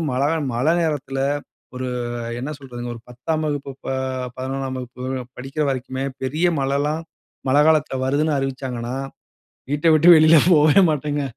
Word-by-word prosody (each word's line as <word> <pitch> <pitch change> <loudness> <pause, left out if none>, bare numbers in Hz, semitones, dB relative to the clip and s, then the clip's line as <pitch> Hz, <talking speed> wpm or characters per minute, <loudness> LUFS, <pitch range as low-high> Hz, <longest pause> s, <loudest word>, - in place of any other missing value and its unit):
மழைகா 140 +5 +1 0.2
மழை 130 +7 +2
நேரத்தில 145 -4 -2 0.6
ஒரு 130 0 -3 0.5
என்ன 135 +4 -4
சொல்றதுங்க? 120 -3 -7
ஒரு 115 - -12
10ஆம் 155 +6 -2
வகுப்பு, 145 -2 -3
ப - - -6 0.5
11ஆம் 130 0 -3
வகுப்பு 125 0 -8 0.3
படிக்கிற 135 +4 -4
வரைக்குமே, 130 0 -3 0.2
பெரிய 155 +7 +1
மழைலாம், 145 +4 0 0.5
மழை 145 +2 +5
காலத்தில 155 -4 +2
வருதுன்னு 145 +2 +1
அறிவிச்சாங்கன்னா, 130 -2 -4 0.8
வீட்ட 150 +3 +1
விட்டு 160 +3 +6
வெளியில 155 +1 +7
போவே 155 +3 +6
மாட்டேங்க. 145 -1 -1
140 Hz, 130 wpm, -21 LUFS, 130-155 Hz, 0.8 s, வெளியில